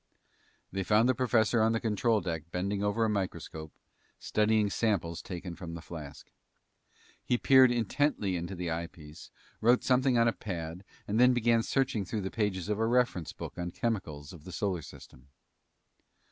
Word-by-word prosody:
They 95 - -2
found 105 +5 +3
the 130 - +4
professor 120 -2 +2
on 110 +1 +3
the 115 - +1
control 110 0 +1
deck 80 -4 -4
bending 100 +3 -2
over 105 +2 +1
a - - +2
microscope, 85 -6 -4 0.5
studying 105 -1 +1
samples 95 -8 0
taken 90 -1 -6
from 85 -2 -7
the 85 - -7
flask. 75 -5 -9 0.9
He 125 - +1
peered 130 0 +6
intently 120 -3 0
into 85 +2 -4
the 90 -1 -3
eyepiece, 80 -2 -7 0.3
wrote 120 +3 +4
something 130 -1 +3
on 115 0 +4
a 115 - +2
pad, 85 -2 -6 0.2
and 105 +3 0
then 125 0 +6
began 120 -1 +3
searching 130 -4 0
through 105 +3 -3
the 95 - -4
pages 100 -5 -1
of 105 0 -1
a 115 - +2
reference 120 -9 +1
book - - -8
on 90 0 -2
chemicals 85 -9 -3
of 80 -4 -12
the 90 - -9
solar 95 -2 -2
system. 65 -2 -14
100 Hz, 170 wpm, -30 LUFS, 85-115 Hz, 0.9 s, peered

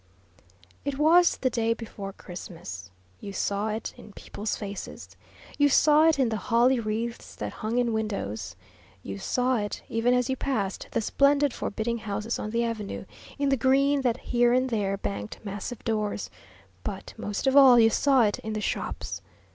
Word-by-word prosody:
It 280 -1 -3
was 335 +4 +5
the 255 - 0
day 230 -1 +1
before 210 -4 -7
Christmas. 165 - -9 0.3
You 200 - -7
saw 200 +2 -1
it 220 +1 -4
in 210 - -13
people's 210 +2 -4
faces; 200 -1 -7 0.4
you 290 0 +5
saw 305 +3 +5
it 320 - +4
in 260 -4 +2
the 220 - -1
holly 240 +5 +3
wreaths 230 +2 -4
that - - -5
hung 220 +2 -3
in 240 -2 +2
windows; 200 - -3 0.5
you 100 0 -6
saw 250 - +1
it, 205 -1 -4
even 235 +2 +2
as 250 -1 +1
you 265 - 0
passed 215 -9 -2
the - - -1
splendid, 280 +3 +3
forbidding 235 +3 -2
houses 215 +2 -3
on 215 - -4
the 235 +2 0
avenue, 225 -3 -4 0.3
in 280 -1 +1
the 275 - +4
green 275 +3 +3
that 245 -2 +1
here 240 0 +2
and 255 0 +2
there 200 -3 0
banked 100 - -5
massive 205 +3 -6
doors; 210 - -2 0.5
but 195 - -6
most 205 +4 -4
of 265 0 +3
all, 265 -4 +9
you 225 0 +6
saw 270 -1 +4
it 205 -2 +1
in 220 - -5
the 215 - -2
shops. - - -3
230 Hz, 175 wpm, -27 LUFS, 205-260 Hz, 0.5 s, all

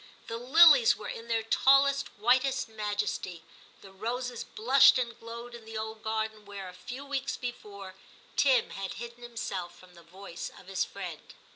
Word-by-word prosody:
The 230 - -5
lilies 335 - +7
were - - -7
in 230 - -7
their 225 -1 0
tallest, 275 +4 +4
whitest 255 +5 +2
majesty, 210 -5 -3 0.4
the 195 - -13
roses 240 +5 -4
blushed 270 +5 +5
and 235 -2 -3
glowed 235 +1 -9
in 235 -1 -10
the 220 0 -7
old 220 0 -5
garden, 220 -1 -3
where, 200 -2 -8
a - - -12
few 250 +10 -8
weeks 275 -1 -3
before, 200 -6 -7 0.4
Tim 265 -4 +3
had 195 -1 -5
hidden 235 +2 -9
himself 205 -7 -5
from 185 -1 -17
the 170 - -15
voice 180 +1 -8
of - - -16
his 190 0 -1
friend. 180 -6 -8
225 Hz, 165 wpm, -29 LUFS, 200-250 Hz, 0.4 s, lilies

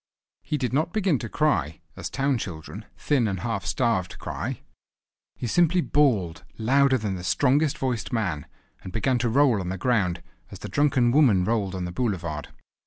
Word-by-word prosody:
He 150 - -2
did 125 -3 -2
not 160 +5 0
begin 190 - +1
to 115 - -6
cry, 80 - 0 0.2
as - - -5
town 135 -2 0
children, 95 +3 -7
thin 135 -6 +1
and 95 -3 -3
half 110 -5 -3
starved, 115 -6 0
cry; - - -5 0.7
he - - -5
simply 175 +7 +3
bawled 115 - +1
louder 130 +4 +3
than 105 -4 -3
the 90 -1 -6
strongest 140 - +2
voiced 125 -4 -2
man; 90 - -2 0.3
and 95 - -8
began 125 +4 0
to 120 0 0
roll 130 -2 +3
on 90 - -4
the 95 - -3
ground, 90 -6 0 0.3
as - - -9
the - - -8
drunken 135 -5 +2
women 120 -10 +4
rolled 100 -2 -1
on 90 -1 -3
the 90 - -5
boulevard. 85 - -3
115 Hz, 175 wpm, -25 LUFS, 95-140 Hz, 0.7 s, women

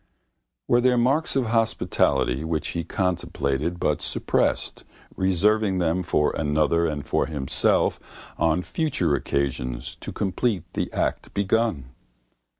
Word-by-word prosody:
Were 120 0 +4
there 125 0 +3
marks 135 +7 +1
of 135 -2 +2
hospitality 110 - +1
which 80 -1 -2
he 85 - -3
contemplated 85 -3 -1
but - - 0
suppressed, - - 0 0.3
reserving 95 +2 +2
them 85 0 +1
for 75 -4 +1
another 80 +2 +1
and 75 -3 -4
for - - 0
himself 70 -4 +1 0.4
on 85 +2 +1
future 125 - 0
occasions 65 -3 -2
to - - -7
complete 100 -1 -1
the - - -2
act - - -2
begun? 100 - 0
85 Hz, 120 wpm, -24 LUFS, 75-110 Hz, 0.4 s, Were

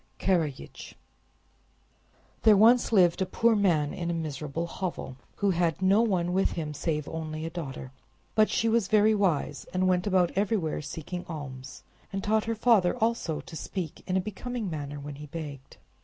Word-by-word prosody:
Karajich 160 -7 -2 1.5
There 215 -2 +6
once 235 +4 +5
lived 180 -4 +4
a - - +3
poor 230 +3 +3
man 170 -8 +2
in 170 -1 -3
a 170 - -1
miserable 155 0 -3
hovel, 170 -6 -5 0.2
who 200 -1 +1
had 170 -3 0
no 190 +3 +4
one 180 -6 +1
with 190 +1 +2
him 155 -3 -4
save 150 0 -2
an - - -9
only 160 0 -4
daughter. 135 -6 -6 0.4
But 215 0 +4
she 230 - +1
was 225 -3 +2
very 215 0 +4
wise, 175 -8 0
and 185 0 +2
went 180 +1 +1
about 185 -3 +3
everywhere 195 -6 0
seeking 170 +4 -6
alms, 130 -5 -8 0.3
and 195 0 -3
taught 215 +1 +1
her 230 0 -1
father 215 -6 +3
also 225 -9 0
to 160 - -11
speak 170 -1 -5
in 185 0 +1
a - - +2
becoming 215 +1 -5
manner 145 -2 -5
when 145 0 -7
he 150 +1 -9
begged. 145 -4 -8
175 Hz, 170 wpm, -28 LUFS, 155-205 Hz, 1.5 s, There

